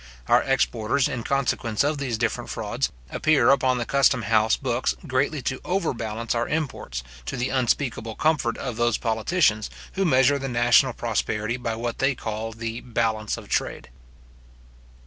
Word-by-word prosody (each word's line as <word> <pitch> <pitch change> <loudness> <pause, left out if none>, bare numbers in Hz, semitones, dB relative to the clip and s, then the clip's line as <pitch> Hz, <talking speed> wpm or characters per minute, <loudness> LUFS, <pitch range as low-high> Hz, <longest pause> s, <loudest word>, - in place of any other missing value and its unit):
Our - - +5
exports, 130 -1 +1
in 120 - -3
consequence 125 -3 0
of 145 0 0
these 125 -5 -2
different - - -2
frauds, - - -2 0.2
appear 155 -6 +4
upon 130 -2 +3
the 120 - -2
custom 135 -3 +3
house 110 +1 +3
books 125 -2 -1
greatly 135 0 0
to 130 - -2
overbalance 115 - -2
our 120 0 0
imports, 135 - -3 0.2
to - - -3
the 125 +1 -1
unspeakable 120 -3 -1
comfort 145 -7 +1
of 125 -4 -5
those 120 -1 +2
politicians, 110 - +1 0.2
who 195 - 0
measure 140 -4 +4
the 135 0 -4
national 120 +1 +4
prosperity 115 -1 -1
by 115 -2 -3
what 115 +1 -4
they 135 0 +2
call 110 -1 -4
the 115 +1 -5
balance 110 -3 -1
of - - -10
trade. - - -2
120 Hz, 155 wpm, -24 LUFS, 115-135 Hz, 0.2 s, Our